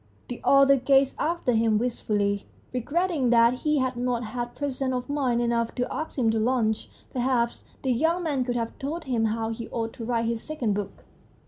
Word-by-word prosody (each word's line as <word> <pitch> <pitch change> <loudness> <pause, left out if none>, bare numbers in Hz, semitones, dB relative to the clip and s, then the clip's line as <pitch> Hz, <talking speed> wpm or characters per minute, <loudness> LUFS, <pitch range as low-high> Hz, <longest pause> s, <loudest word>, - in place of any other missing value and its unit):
The 245 - -6
author 275 0 +6
gazed 270 +1 +3
after 330 -5 0
him 225 -2 +3
wistfully, 205 -4 -1 0.3
regretting 295 +2 0
that 235 +1 +4
he 300 -1 +1
had 260 -2 0
not 245 -1 -1
had 240 +2 -5
presence 270 -2 -2
of 250 0 -3
mind 260 -5 +1
enough 235 -1 0
to 245 -1 -2
ask 315 - -5
him 230 -4 +3
to 225 - 0
lunch. 220 -2 0 0.2
Perhaps 245 -2 0 0.2
the 260 - +1
young 325 +8 +1
man 285 -6 0
could 245 -1 -2
have 230 -1 -3
told 315 +5 -4
him 245 -6 0
how 225 0 -1
he 225 0 -5
ought 225 -1 -3
to 230 - -8
write 230 -1 0
his 230 0 -1
second 265 -9 -2
book. 200 -1 -5
245 Hz, 195 wpm, -26 LUFS, 230-275 Hz, 0.3 s, author